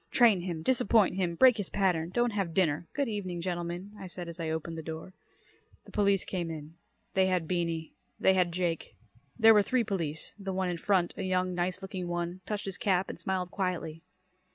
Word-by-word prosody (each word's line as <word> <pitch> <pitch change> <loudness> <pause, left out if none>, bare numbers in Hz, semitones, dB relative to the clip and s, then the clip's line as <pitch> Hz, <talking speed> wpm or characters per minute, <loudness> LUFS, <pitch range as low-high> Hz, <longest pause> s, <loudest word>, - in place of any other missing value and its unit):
"Train 225 -7 +5
him. 170 -3 -4
Disappoint 225 -4 +4
him. 175 -3 0
Break 250 +3 +6
his 205 -4 -3
pattern. 175 -4 +1
Don't 240 +5 +1
have 195 -6 -2
dinner. 170 -3 +1
Good 280 -2 +1
evening, 190 -5 -3
gentlemen," 175 +2 -4
I 190 - -7
said 175 -1 -7
as 170 0 -8
I 165 -1 -2
opened 160 +1 -3
the - - -4
door. 160 +3 -7 0.7
The - - -14
police 200 -2 +2
came 175 -3 -3
in. 155 -1 -7 0.4
They 190 0 +4
had 180 -3 0
Beany. 165 -2 -2 0.3
They 190 - +5
had 180 -2 +2
Jake. 170 -2 -2 0.4
There 225 -1 +8
were 210 - +6
three 250 +4 +1
police. 165 -7 -2
The 195 -1 -4
one 185 -1 0
in 175 - -2
front, 185 -3 +2
a - - -3
young, 185 -1 0
nice 180 +2 -1
looking 185 -2 -4
one, 175 +1 -3
touched 210 -1 -3
his 195 -2 -5
cap 190 -2 +1
and - - -7
smiled 185 -2 -2
quietly. 170 -4 -2
180 Hz, 200 wpm, -30 LUFS, 170-195 Hz, 0.7 s, There